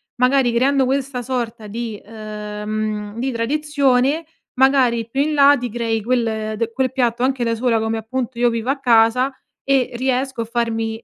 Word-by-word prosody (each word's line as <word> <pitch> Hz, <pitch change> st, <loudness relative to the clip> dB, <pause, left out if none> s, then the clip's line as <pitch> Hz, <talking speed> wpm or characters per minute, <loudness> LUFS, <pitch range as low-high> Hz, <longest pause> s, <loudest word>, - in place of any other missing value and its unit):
magari 250 Hz, -1 st, +3 dB
creando 265 Hz, +3 st, +3 dB
questa 265 Hz, -1 st, -1 dB
sorta 235 Hz, -3 st, -4 dB
di 225 Hz, 0 st, -5 dB
uhm, 210 Hz, 0 st, -5 dB
di 265 Hz, +2 st, -1 dB
tradizione, 280 Hz, +3 st, +1 dB, 0.3 s
magari 255 Hz, -4 st, +3 dB
più 270 Hz, +4 st, 0 dB
in 305 Hz, +2 st, 0 dB
là 285 Hz, 0 st, +6 dB
ti 245 Hz, 0 st, -4 dB
crei 225 Hz, -1 st, -1 dB
quel 220 Hz, -2 st, -1 dB
d 230 Hz, +1 st, -2 dB
quel 260 Hz, +2 st, -1 dB
piatto 245 Hz, -2 st, 0 dB
anche 260 Hz, -1 st, +1 dB
da 230 Hz, -1 st, 0 dB
sola, 230 Hz, -1 st, +1 dB
come 220 Hz, 0 st, -1 dB
appunto, 240 Hz, +2 st, -4 dB
io 240 Hz, 0 st, +4 dB
vivo 230 Hz, +1 st, -3 dB
a 275 Hz, +1 st, 0 dB
casa 245 Hz, +2 st, +3 dB, 0.3 s
e 270 Hz, -2 st, +1 dB
riesco 260 Hz, 0 st, -1 dB
a -, -, -3 dB
farmi 225 Hz, -1 st, -2 dB
240 Hz, 170 wpm, -20 LUFS, 225-265 Hz, 0.3 s, là